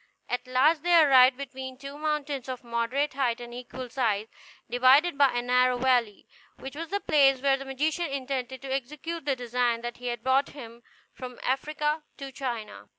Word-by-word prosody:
At 245 +1 -3
last 285 +5 +3
they 345 0 +5
arrived 260 -4 +6
between 260 -1 -7
two 275 +1 -9
mountains 295 -3 -3
of 255 -1 -6
moderate 240 +5 -1
height, 250 -4 0
and 240 0 -9
equal 250 +1 -7
size, 225 -4 -1 0.4
divided 260 +7 +4
by 280 -2 +4
a 240 0 -1
narrow 250 0 +3
valley, 245 -4 +1 0.3
which 270 +1 -9
was 330 +2 -5
the 405 - -1
place 275 -7 +4
where 275 +1 +3
the 275 - -8
magician 305 +6 -1
intended 265 -2 -4
to 265 -1 -3
execute 300 +5 -5
the 280 -2 +1
design 245 -1 -1
that 240 0 -6
had 240 -1 -5
brought 265 +2 +2
him 235 -4 -11 0.3
from 250 -1 -9
Africa 300 +3 -1 0.2
to 275 -1 -7
China. 230 - -6
260 Hz, 175 wpm, -27 LUFS, 245-280 Hz, 0.4 s, arrived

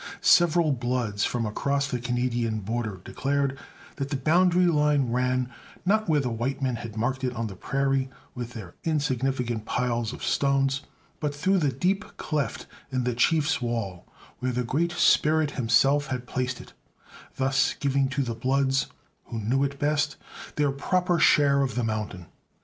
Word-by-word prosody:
Several 170 -2 +4
Bloods 120 -5 -1
from 120 -2 -1
across 140 +6 0
the 125 -3 -2
Canadian 120 -2 -1
border 110 -1 -3
declared 140 0 -1 0.4
that 140 -1 -3
the 140 - -1
boundary 175 +6 +3
line 150 -6 +2
ran, 125 0 +1 0.4
not 215 +1 +2
where 155 -2 +4
the 125 -3 -1
white 120 +4 -2
men 130 -3 -1
had 110 -2 -8
marked 130 +4 -1
it 125 -1 -1
on 115 0 -2
the 100 -3 -6
prairie 135 +4 0 0.2
with 120 -1 -6
their 95 -7 -8
insignificant 130 -6 -1
piles 120 -2 -1
of - - -9
stones, 135 0 +1 0.4
but 145 -2 -2
through 185 +6 +2
the 145 -5 +1
deep 185 - -1
cleft 150 -2 -2 0.3
in 130 -1 0
the 125 0 0
Chief's 150 +5 +2
wall, 115 -7 -3 0.3
where 130 0 -1
the 125 0 -1
Great 160 +8 0
Spirit 155 -3 +3
himself 135 +4 +3
had 125 -2 -4
placed 125 0 -2
it; - - -13 0.6
thus 135 0 +1
giving 140 -1 +1
to 135 +1 0
the 120 -2 -3
Bloods, 135 +4 +1 0.4
who 115 - -6
knew 125 +6 +1
it 140 0 -2
best, 145 +1 +1 0.4
their 145 -1 +2
proper 180 +5 +1
share 140 -2 +5
of 135 -2 -1
the 120 - 0
mountain. 105 -5 -3
135 Hz, 165 wpm, -26 LUFS, 120-145 Hz, 0.6 s, share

